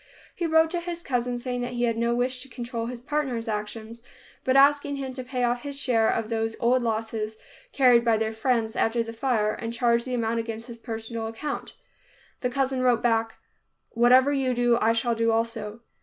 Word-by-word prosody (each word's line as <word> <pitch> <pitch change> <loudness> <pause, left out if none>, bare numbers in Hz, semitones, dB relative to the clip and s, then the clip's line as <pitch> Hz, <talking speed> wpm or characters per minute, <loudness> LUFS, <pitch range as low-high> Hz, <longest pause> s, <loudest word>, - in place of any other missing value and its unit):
He 340 - -2
wrote 320 0 +4
to 350 - 0
his 345 0 -5
cousin, 245 -1 -1
saying 245 0 -3
that 245 0 -4
he 240 0 -1
had 230 -1 +1
no 235 +1 +1
wish 250 +1 -1
to 270 - -8
control 235 -2 -5
his 245 0 -6
partner's 260 -3 -2
action, 215 +1 -4 0.5
but 260 - +1
asking 285 +1 +4
him 270 -2 -5
to 255 0 -6
pay 250 0 -3
off 240 0 +1
his 280 -1 -5
share 230 -5 +2
of 225 -1 0
those 225 -1 -1
old 250 +1 +3
losses 220 -1 -2 0.3
carried 250 - +5
by 230 -2 +3
their 220 0 -1
friends 225 -1 0
after 230 +1 +1
the 230 0 -7
fire, 225 -3 0
and 230 0 -5
charge 235 0 +2
the 255 -1 -2
amount 230 -1 0
against 225 0 -5
his 235 -1 -9
personal 225 -1 -5
account. 225 +7 -5 0.7
The 250 - -1
cousin 265 0 0
wrote 245 -2 +2
back, 225 -1 +1 0.6
"Whatever 255 +4 +5
you 260 -3 0
do, 240 -1 +3
I 225 +1 +4
shall 235 +1 +1
do 230 0 +1
also." 225 -1 -2
240 Hz, 200 wpm, -26 LUFS, 225-255 Hz, 0.7 s, carried